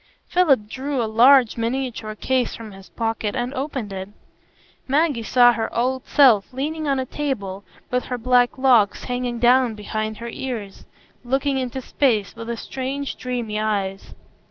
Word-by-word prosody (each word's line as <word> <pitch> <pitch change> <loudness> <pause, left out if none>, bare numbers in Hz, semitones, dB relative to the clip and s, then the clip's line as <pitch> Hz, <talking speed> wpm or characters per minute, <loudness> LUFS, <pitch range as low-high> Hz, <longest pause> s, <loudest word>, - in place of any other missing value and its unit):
Philip 275 -12 +3
drew 270 +4 -3
a 235 - +1
large 240 +3 +5
miniature 230 -2 -3
case 255 +3 0
from 225 -2 -9
his 195 0 -14
pocket, 225 -2 -2
and 245 +1 -2
opened 265 -6 -4
it. 190 0 -6 0.8
Maggie 285 -2 +1
saw 245 +1 +5
her 225 -1 -3
old 255 +2 -1
self 245 -9 +5
leaning 300 +4 -3
on 275 -1 +1
a 260 - -2
table, 205 -10 -4 0.3
with 250 0 0
her 250 - -3
black 245 +1 +2
locks 245 -6 +3
hanging 245 -1 -3
down 245 -1 +4
behind 215 +1 -4
her 235 0 -6
ears, 230 -6 -6 0.4
looking 270 +2 0
into 260 0 -4
space, 235 -6 0
with 230 0 -8
strange, 270 +3 -4
dreamy 240 -4 -3
eyes. 200 -3 -2
245 Hz, 155 wpm, -22 LUFS, 220-265 Hz, 0.8 s, large